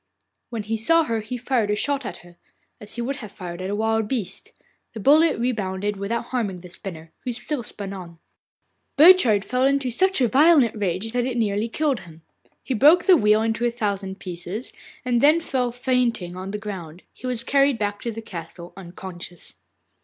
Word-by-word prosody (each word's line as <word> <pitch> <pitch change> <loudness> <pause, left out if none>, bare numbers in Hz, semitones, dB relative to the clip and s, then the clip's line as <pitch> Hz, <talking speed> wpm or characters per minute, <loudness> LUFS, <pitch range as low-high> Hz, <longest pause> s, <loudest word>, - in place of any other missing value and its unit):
When 230 -3 -4
he 225 +2 -2
saw 330 +9 +4
her 230 -6 -1
he 225 +4 -5
fired 240 -3 0
a 210 - +2
shot 280 +2 -1
at 175 - -6
her, 175 0 -16 0.4
as 210 - -8
he 240 - -3
would 275 +3 -3
have 215 -7 -9
fired 180 -4 -7
at 185 - -4
a 205 - -1
wild 220 0 0
beast. 210 -6 -4 0.4
The 225 - -7
bullet 305 +8 +5
rebounded 205 -4 -1
without 200 +4 -3
harming 205 -8 -2
the 180 - -11
spinner, 165 -3 -8
who 250 - -4
still 255 +3 -4
spun 200 -3 -7
on. 175 -3 -9 0.8
Burchard 280 - +7
fell 250 +4 0
into 275 -2 +2
such 380 +9 +2
a 250 - +4
violent 280 -1 +5
rage 200 +1 -2
that 245 0 0
it 250 -2 -2
nearly 210 -1 0
killed 285 -1 0
him. 165 -3 -14 0.4
He 265 - -2
broke 300 +9 +6
the 375 - +7
wheel 215 -5 +3
into 225 +1 -1
a 240 - +3
thousand 200 -5 -3
pieces, 180 +6 -6 0.3
and 240 -2 +1
then 305 +3 +6
fell 255 -6 -1
fainting 245 -7 0
on 185 +1 -6
the 210 - -3
ground. 185 -5 -8
He 255 - -8
was 245 -2 -2
carried 275 +1 +3
back 205 -1 -2
to 235 - -3
the 225 0 -7
castle, 170 -2 -9
unconscious. 175 -1 -9
225 Hz, 195 wpm, -23 LUFS, 195-255 Hz, 0.8 s, Burchard